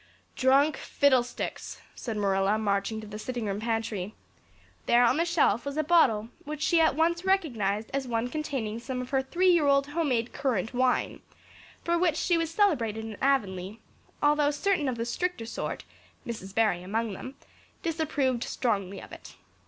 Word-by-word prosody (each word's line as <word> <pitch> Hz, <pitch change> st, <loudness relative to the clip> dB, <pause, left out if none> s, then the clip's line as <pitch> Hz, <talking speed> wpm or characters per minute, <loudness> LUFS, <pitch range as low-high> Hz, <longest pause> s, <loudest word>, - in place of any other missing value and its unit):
"Drunk 275 Hz, +4 st, +3 dB
fiddlesticks!" 260 Hz, -4 st, 0 dB
said 225 Hz, -3 st, -5 dB
Marilla, 195 Hz, 0 st, +2 dB
marching 205 Hz, 0 st, -1 dB
to -, -, -9 dB
the 210 Hz, 0 st, -8 dB
sitting 240 Hz, 0 st, -4 dB
room 200 Hz, 0 st, -2 dB
pantry. 220 Hz, -3 st, -3 dB, 0.7 s
There 240 Hz, +1 st, +5 dB
on 250 Hz, +4 st, +3 dB
the 335 Hz, -, +2 dB
shelf 310 Hz, -10 st, +2 dB
was 280 Hz, +1 st, -5 dB
a 310 Hz, -, +2 dB
bottle 255 Hz, -10 st, +3 dB
which 305 Hz, +1 st, -5 dB
she 335 Hz, -1 st, +4 dB
at 315 Hz, -4 st, +3 dB
once 335 Hz, +2 st, +1 dB
recognized 230 Hz, -, 0 dB
as 275 Hz, -1 st, -1 dB
one 230 Hz, 0 st, -1 dB
containing 250 Hz, -6 st, -3 dB
some 250 Hz, +2 st, -4 dB
of 250 Hz, 0 st, -6 dB
her 270 Hz, -1 st, +2 dB
three 360 Hz, +7 st, +2 dB
year 330 Hz, -4 st, +3 dB
old 275 Hz, 0 st, +4 dB
homemade 275 Hz, -7 st, 0 dB
currant 245 Hz, -6 st, -1 dB
wine 255 Hz, 0 st, +1 dB, 0.6 s
for 340 Hz, 0 st, +1 dB
which 345 Hz, -3 st, +2 dB
she 350 Hz, -, +2 dB
was 330 Hz, -1 st, 0 dB
celebrated 245 Hz, -, +1 dB
in 220 Hz, -2 st, -6 dB
Avonlea, 205 Hz, -7 st, 0 dB, 0.5 s
although 295 Hz, 0 st, +4 dB
certain 300 Hz, -1 st, 0 dB
of 245 Hz, -, -3 dB
the 230 Hz, -, -2 dB
stricter 300 Hz, 0 st, -2 dB
sort, 230 Hz, -, -4 dB, 0.4 s
Mrs. 205 Hz, -5 st, -7 dB
Barry 210 Hz, -6 st, +2 dB
among 215 Hz, +3 st, -2 dB
them, 255 Hz, +8 st, -8 dB, 0.5 s
disapproved 295 Hz, -7 st, 0 dB
strongly 200 Hz, -5 st, -2 dB
of -, -, -12 dB
it. -, -, -11 dB
250 Hz, 170 wpm, -28 LUFS, 220-305 Hz, 0.7 s, There